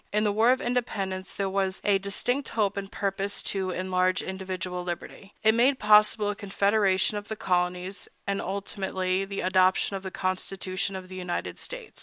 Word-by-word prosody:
In 210 +1 +2
the 210 - +3
War 220 +3 +4
of 255 0 +4
Independence 200 -6 -2
there 195 - 0
was 190 0 0
a 200 -1 +3
distinct 245 +7 -1
hope 205 -3 +1
and 200 -1 -5
purpose 195 0 -2
to 190 -2 -1
enlarge 185 0 +1
individual 185 -1 -4
liberty. 175 +3 -7
It 220 0 +6
made 255 +4 +4
possible 210 -1 +5
a - - -5
confederation 200 0 +2
of 205 0 -6
the 220 - -4
colonies, 180 0 -1 0.2
and, 200 0 -1
ultimately, 190 -1 -2
the 195 0 -4
adoption 185 +1 +3
of 195 - -4
the 190 - -5
Constitution 185 +1 -2
of 185 -1 -6
the 185 0 -8
United 180 -1 -3
States. - - -8
195 Hz, 175 wpm, -27 LUFS, 185-205 Hz, 0.2 s, It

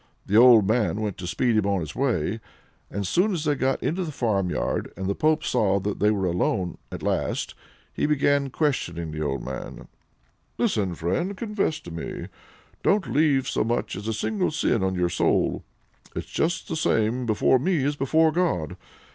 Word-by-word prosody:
The 100 - -1
old 115 -3 +7
man 110 -1 +1
went 105 -3 -3
to 90 - -5
speed 120 +5 +1
him 105 -2 +2
on 100 -1 +1
his 80 0 -6
way. 110 - 0 0.5
As 100 0 -3
soon 190 - +2
as 160 -3 -2
they 150 - +3
got 135 -1 -1
into 185 +4 0
the 160 - -4
farmyard, 100 -9 -1
and 95 - -4
the 100 - 0
pope 155 +7 +1
saw 100 -2 +2
they 105 +1 0
were 100 -3 0
alone 90 0 -1
at - - -7
last, - - -1 0.4
he - - 0
began 145 -1 +2
questioning 85 - -1
the 75 0 -5
old 70 -2 -2
man: - - -7 0.7
"Listen, 95 -4 0
friend! 95 - -2
confess 210 -7 -1
to 85 - -10
me, 80 0 -6 0.5
don't 205 -1 +1
leave 140 -3 +3
so - - 0
much 120 +2 -1
as 100 +3 -6
a 110 - 0
single 185 - -1
sin 135 -7 0
on 95 0 0
your 90 -1 +1
soul 85 - +1 0.5
it's - - -3
just 165 +1 -1
the 165 - -3
same 125 -6 +1
before 110 +4 +3
me 160 0 +1
as 145 +1 0
before 155 +4 +3
God! 165 - -1
115 Hz, 180 wpm, -25 LUFS, 95-155 Hz, 0.7 s, old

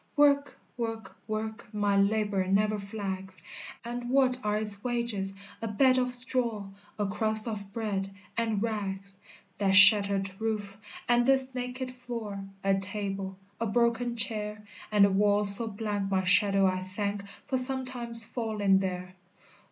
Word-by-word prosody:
"Work 285 -1 +3 0.2
work 225 -4 -5
work 220 0 -5
My 205 -2 0
labor 200 -1 +1
never 210 +2 +2
flags; 195 -2 -5 0.5
And 240 0 -5
what 255 -1 +3
are 210 0 0
its 210 -2 -1
wages? 235 -6 -1 0.3
A 225 - -2
bed 255 +4 +3
of 250 0 -1
straw, 240 -5 -2 0.3
A 205 - 0
crust 215 +2 0
of 200 -3 -5
bread 200 -3 -3 0.3
and 225 -2 0
rags, 195 -3 -4 0.4
That 195 -2 +2
shattered 200 -1 +6
roof 210 -3 -2 0.3
and 240 0 +4
this 265 0 +6
naked 250 +1 -4
floor 230 -6 -6 0.2
A 195 0 +2
table 195 -1 -4 0.2
a 230 - -1
broken 235 +2 +1
chair 210 -2 -4 0.3
And 205 -1 +6
a 200 - +2
wall 205 +1 +3
so 205 +3 +4
blank 205 -2 -3
my 190 -1 +1
shadow 195 +1 +3
I 185 -1 +1
thank 200 +2 -3 0.2
For 260 - -1
sometimes 250 -3 +2
falling 210 -5 +1
there! 185 -1 -4
210 Hz, 145 wpm, -29 LUFS, 195-235 Hz, 0.5 s, shattered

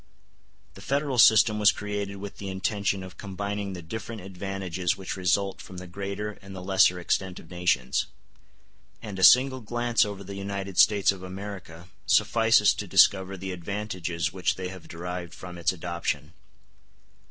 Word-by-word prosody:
The - - -13
Federal 140 -2 -1
system 110 -1 +6
was 105 0 +6
created 105 -1 -4
with 100 0 -8
the 100 - -5
intention 100 0 -1
of 95 -1 -11
combining 100 0 -4
the 90 -2 -8
different 110 +5 -6
advantages 95 -2 -3
which 95 -1 -5
result 95 +1 0
from 95 - -11
the 90 - -7
greater 100 +3 -5
and 100 0 -11
the 90 - -7
lesser 95 -1 +4
extent 90 +1 -1
of 80 - -15
nations; 90 -8 0 1.0
and 100 -3 -6
a - - 0
single 130 +3 +6
glance 120 +1 +1
over 100 -2 -5
the 100 +1 -8
United 100 -1 -4
States 100 -2 +5
of 95 -2 -8
America 95 -3 -8 0.2
suffices 115 -2 +4
to - - -6
discover 95 0 +4
the 95 +1 -5
advantages 90 -2 -3
which 95 -1 0
they 90 -1 -5
have 95 -2 -11
derived 90 0 -6
from 90 0 -9
its 85 -1 +1
adoption. 85 -3 -4
95 Hz, 160 wpm, -27 LUFS, 90-105 Hz, 1.0 s, system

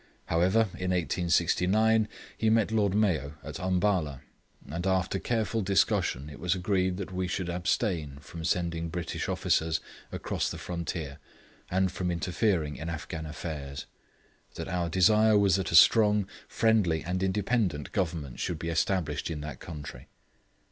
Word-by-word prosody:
However, 90 +7 +3 0.2
in 90 0 -2
1869 90 +5 +2 0.3
he 110 - +1
met 110 -1 +3
Lord 105 -3 +2
Mayo 80 -9 +1
at 75 +2 -7
Umballa, 90 -7 0 0.5
and 85 +6 -3
after 95 0 +1
careful 115 0 -1
discussion 90 -7 +1
it 75 -2 -10
was 90 +1 +1
agreed 95 -1 0
that 95 -1 -6
we 90 0 -1
should 90 -1 -2
abstain 85 - -1
from 80 +3 -9
sending 85 0 -1
British 85 0 -4
officers 80 0 +1 0.3
across - - -2
the - - -5
frontier 85 -4 -5 0.5
and 95 0 +1
from 90 -1 -2
interfering 85 -2 0
in 80 +2 -5
Afghan 80 -1 -5
affairs; 70 -3 -6 0.7
that - - -5
our 90 -2 -1
desire 105 +5 +5
was 100 -2 +4
that 95 - -2
a - - +2
strong, 105 +1 +6 0.2
friendly, 105 -8 +2
and 90 +3 -2
independent 95 - 0
Government 80 -8 -2
should 85 - -2
be 85 +1 -4
established 80 -2 0
in 80 -3 -4
that 75 -4 -7
country. 75 -7 -8
90 Hz, 145 wpm, -29 LUFS, 80-95 Hz, 0.7 s, strong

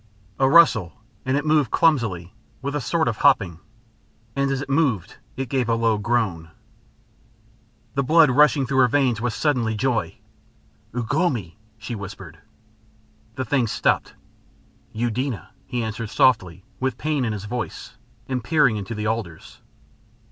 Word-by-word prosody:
A 135 0 +4
rustle, 130 - +5 0.3
and 130 +1 +2
it 145 - -2
moved 150 -5 +3
clumsily, 110 - +1 0.3
with 140 +1 -3
a 150 - -1
sort 160 +5 0
of 115 -3 -1
hopping. 100 - +3 0.8
And 140 0 +1
as 135 -1 -1
it 140 - -5
moved 135 - 0 0.2
it 135 0 -3
gave 125 -1 -1
a 115 - +3
low 115 -2 +1
groan. 100 -8 -1 1.4
The 140 - +1
blood 155 +1 +5
rushing 145 +1 +4
through 135 +1 0
her 125 - +6
veins 125 -4 +1
was 120 -2 -1
suddenly 125 -7 0
joy. 115 +1 -1 0.8
"Ugh 120 +2 -2
lomi!" 130 - 0 0.2
she 110 +2 -7
whispered. 95 -6 -8 1.0
The 130 - -3
thing 125 0 +1
stopped. - - 0 0.8
"Eudena," 115 - -3 0.2
he 125 -3 -2
answered 110 0 -4
softly 95 -7 +2
with 130 -2 -1
pain 150 -2 -1
in 115 - -1
his 105 -1 -5
voice, 120 +2 -5 0.3
and 130 -3 -2
peering 135 -4 +3
into 100 +2 -5
the 105 0 -4
alders. 110 -8 -5
120 Hz, 150 wpm, -23 LUFS, 110-140 Hz, 1.4 s, her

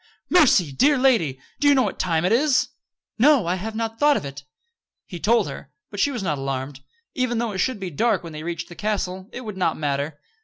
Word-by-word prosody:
"Mercy! 230 - +5
Dear 280 - +3
lady! 225 - +2 0.2
Do 290 - +2
you 285 - +6
know 260 - +4
what - - -4
time 165 -2 0
it 185 - +1
is?" 265 +3 +3 0.5
"No. 275 - +5
I 175 - 0
have 215 +4 -5
not 225 0 -3
thought 295 -1 +4
of - - -5
it." 140 +1 -8 0.6
He 175 -4 -8
told 230 0 +2
her; 140 -1 -8 0.2
but 205 - -7
she 285 - +3
was 245 -7 -4
not 150 -6 -1
alarmed. 135 0 -4 0.3
Even 255 -2 -1
though 230 -1 -1
it 190 - -5
should 255 +2 0
be 185 -2 -5
dark 205 +4 +1
when 165 -2 -8
they 155 - -7
reached 170 +1 -5
the - - -11
castle, 190 -2 -3
it 250 - -7
would 215 -5 -7
not 170 -4 0
matter. 145 0 -2
195 Hz, 230 wpm, -23 LUFS, 160-240 Hz, 0.6 s, you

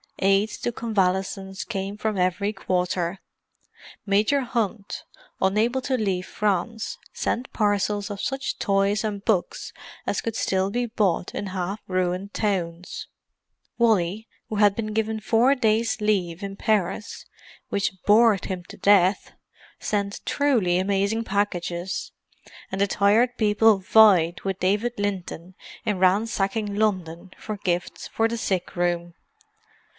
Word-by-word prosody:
Aids 195 +2 +2
to 240 - -1
convalescence 190 -3 -1
came 195 -1 -4
from 215 -1 -2
every 185 +3 0
quarter. 180 -1 -1 0.9
Major 210 +8 +2
Hunt, 225 -5 -3 0.4
unable 220 +7 +2
to 260 0 0
leave 190 -5 -1
France, 210 +2 -1 0.2
sent 250 +3 -2
parcels 205 0 0
of 200 - -5
such 270 0 -2
toys 200 +2 +1
and 205 -2 -4
books 200 -6 -1 0.3
as - - -1
could 225 -2 -3
still 190 -3 0
be 245 +4 -1
bought 210 -7 0
in 205 - -4
half 190 +2 -3
ruined 185 +2 -1
towns. 180 -4 -2 0.7
Wally, 215 -2 +2 0.2
who 215 - -3
had 205 -1 +4
been 215 -2 -3
given 220 0 -1
four 235 +5 +3
days' 220 -2 +1
leave 190 -4 0
in 195 0 -5
Paris—which 200 -1 -3
bored 210 -2 +5
him 185 -2 -4
to - - -12
death—sent 200 +1 0
truly 235 -12 +2
amazing 200 +4 0
packages, 185 -3 -2 0.6
and 190 +1 -2
the 200 - +4
Tired 220 +6 +3
People 215 0 +4
vied 185 -4 +5
with 195 -1 -3
David 210 +6 +1
Linton 185 -3 -4 0.3
in 210 -2 0
ransacking 200 +2 +1
London 185 -5 -1
for 215 -1 -5
gifts 175 -3 -2
for 225 - +1
the 235 +1 -3
sick 190 -5 -2
room. 175 -1 -1
200 Hz, 125 wpm, -24 LUFS, 185-220 Hz, 0.9 s, bored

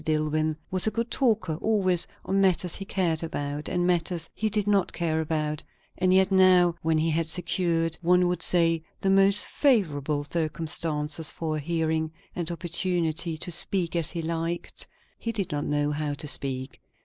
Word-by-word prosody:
Dillwyn 155 0 0 0.2
was 185 +2 +3
a - - +5
good 230 +2 -3
talker, 210 - 0
always, 185 -5 +2 0.2
on 195 +1 +1
matters 185 -2 +2
he 195 - -6
cared 175 -5 0
about, 145 -2 -4
and 175 -1 0
matters 175 -1 0
he 215 - 0
did 210 -1 0
not 200 -3 +2
care 160 -2 0
about; 155 -1 -2 0.3
and 185 0 +1
yet 190 +1 +4
now, 185 -2 +5
when 160 0 +1
he 160 +1 +1
had 165 +1 0
secured, 165 -1 0
one 180 +1 +3
would 175 -1 -1
say, 165 -2 +3 0.2
the 195 - +2
most 195 +1 +4
favourable 155 - +1
circumstances 155 0 -2
for 155 -2 -3
a - - -2
hearing, 160 0 -1 0.2
and 170 -2 -2
opportunity 170 -1 -1
to 175 - -3
speak 175 +1 0
as 165 -3 +1
he 165 - -4
liked, 165 +1 -3 0.3
he 230 - -2
did 205 -5 -2
not 145 -1 -2
know 145 0 0
how 150 -1 -2
to 150 +1 -5
speak. 135 -2 -3
165 Hz, 175 wpm, -26 LUFS, 155-185 Hz, 0.3 s, a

